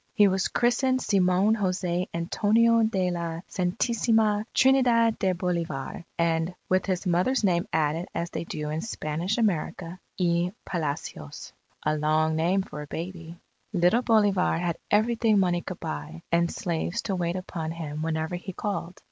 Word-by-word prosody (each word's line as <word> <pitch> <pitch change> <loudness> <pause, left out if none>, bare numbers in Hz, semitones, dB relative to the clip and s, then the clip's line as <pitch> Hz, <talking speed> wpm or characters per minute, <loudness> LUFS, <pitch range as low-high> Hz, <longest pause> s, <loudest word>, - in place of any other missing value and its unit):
He 205 - +6
was 190 -1 +1
christened 255 +2 +2
Simon 195 -1 +3
Jose 185 -3 -1
Antonio 220 +7 +3
de 190 -5 +1
la 170 -1 -3
Santisima 215 +2 +1
Trinidad 245 -4 +4
de 190 -1 +2
Bolivar, 170 -6 -3
and 165 +1 0
with 185 +1 +1
his 185 0 -1
mother's 185 +9 +2
name 180 0 +2
added 160 +2 0
as 170 +1 -2
they - - -3
do 150 -2 -4
in 155 +1 -2
Spanish 170 -1 -2
America, 185 -4 -1 0.2
y 175 0 +1
Palacios. 150 - -5 0.3
A 155 0 +1
long 155 +1 +1
name 180 +5 +2
for 150 - -8
a 150 - -8
baby. 170 +1 -6 0.4
Little 180 +6 +3
Bolivar 205 -8 +3
had 170 -1 -1
everything 220 0 +3
money 175 -2 +2
could 185 -1 -7
buy, 165 0 -6
and 170 0 +3
slaves 170 +5 -2
to 195 - -1
wait 175 -1 -1
upon 175 -3 -4
him 155 -2 -5
whenever 160 +2 -2
he 185 +1 -7
called. 185 -3 -4
180 Hz, 150 wpm, -26 LUFS, 165-205 Hz, 0.4 s, He